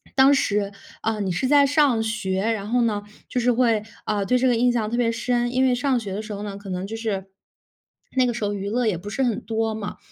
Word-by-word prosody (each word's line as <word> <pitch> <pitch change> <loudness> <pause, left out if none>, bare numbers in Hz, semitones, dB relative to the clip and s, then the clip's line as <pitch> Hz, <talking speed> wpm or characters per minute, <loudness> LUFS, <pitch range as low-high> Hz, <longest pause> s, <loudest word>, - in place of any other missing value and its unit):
当 270 +1 +6
时， 205 -6 +1 0.3
嗯， 215 -2 -1
你 185 - -1
是 255 +9 0
在 285 +1 +6
上 280 -5 +3
学， 195 -4 -1
然 215 -1 -1
后 245 +1 +2
呢， 210 -3 0 0.2
就 250 - -1
是 245 +1 +3
会， 230 -3 +2 0.2
嗯， 205 -2 0
对 250 - +3
这 260 +1 +2
个 245 - +3
印 245 +2 +3
象 220 -3 -1
特 - - 0
别 235 -2 +2
深。 240 +1 0
因 255 +1 +2
为 255 - +3
上 255 0 +1
学 200 -4 -5
的 210 - -3
时 215 -1 -7
候 205 0 -5
呢， 205 -1 -5
可 200 -1 -10
能 185 +1 -3
就 220 - -5
是 210 -4 -2 0.9
那 255 - +5
个 240 - 0
时 230 - -4
候 205 - -1
娱 200 0 -3
乐 240 +3 0
也 210 - +1
不 195 +5 -8
是 240 +6 -1
很 240 -2 0
多 225 -1 -1
嘛。 210 -2 -5
225 Hz, 280 characters per minute, -23 LUFS, 205-245 Hz, 0.9 s, 当